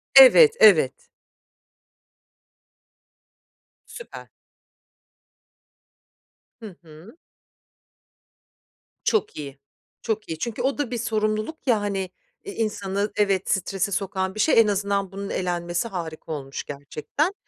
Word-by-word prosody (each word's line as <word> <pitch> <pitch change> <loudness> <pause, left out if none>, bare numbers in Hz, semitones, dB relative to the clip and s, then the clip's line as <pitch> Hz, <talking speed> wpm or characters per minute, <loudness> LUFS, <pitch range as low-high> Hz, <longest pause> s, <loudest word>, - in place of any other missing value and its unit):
Evet, - - +9
evet. 485 +2 +5 2.9
Süper! 480 - -10 2.3
Hı 215 -6 -10
hı. 165 - -15 1.9
Çok 440 - 0
iyi, 140 -2 -8 0.4
çok 220 -1 -3
iyi. 160 -1 -5
Çünkü 235 -2 -4
o 270 +2 0
da 275 -4 -3
bir 240 - -2
sorumluluk, 215 +6 -2
ya, 225 -4 +3
hani, 195 -2 -3 0.3
eee, 200 - -7
insanı 205 -2 -2
Evet, 195 -2 +1
strese 195 +1 -1
sokan 190 0 -2
bir - - -7
şey. 230 +1 +4
En 225 - +5
azından 200 -1 -1
bunun 200 +1 -6
elenmesi 175 +3 -2
harika 165 -6 -7
olmuş 140 -3 -5
gerçekten. 150 - -3
200 Hz, 105 wpm, -24 LUFS, 180-230 Hz, 2.9 s, Evet